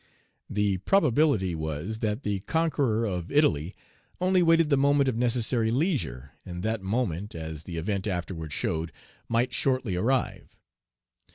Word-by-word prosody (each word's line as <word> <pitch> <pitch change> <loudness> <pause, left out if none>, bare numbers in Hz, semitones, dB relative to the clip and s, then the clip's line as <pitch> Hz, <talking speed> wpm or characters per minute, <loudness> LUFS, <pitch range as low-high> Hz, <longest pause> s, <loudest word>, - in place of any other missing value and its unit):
The 100 -2 +1
probability 145 - +2
was, 80 +7 -4
that 110 +3 -2
the 100 -2 -1
conqueror 140 - 0
of 90 -4 -3
Italy 90 - +2 0.4
only 185 0 +3
waited 165 -2 +4
the - - +6
moment 140 0 +3
of 130 - +1
necessary 120 -1 +1
leisure, 120 - -1
and 90 0 -7
that 110 -1 -1
moment, 100 -2 -2
as 80 -1 -6
the 85 -2 -6
event 95 +4 -2
afterward 90 -4 -4
showed, 80 +3 -2 0.4
might 120 +2 +1
shortly 130 -7 0
arrive. 125 +8 -1
110 Hz, 135 wpm, -27 LUFS, 90-135 Hz, 0.4 s, the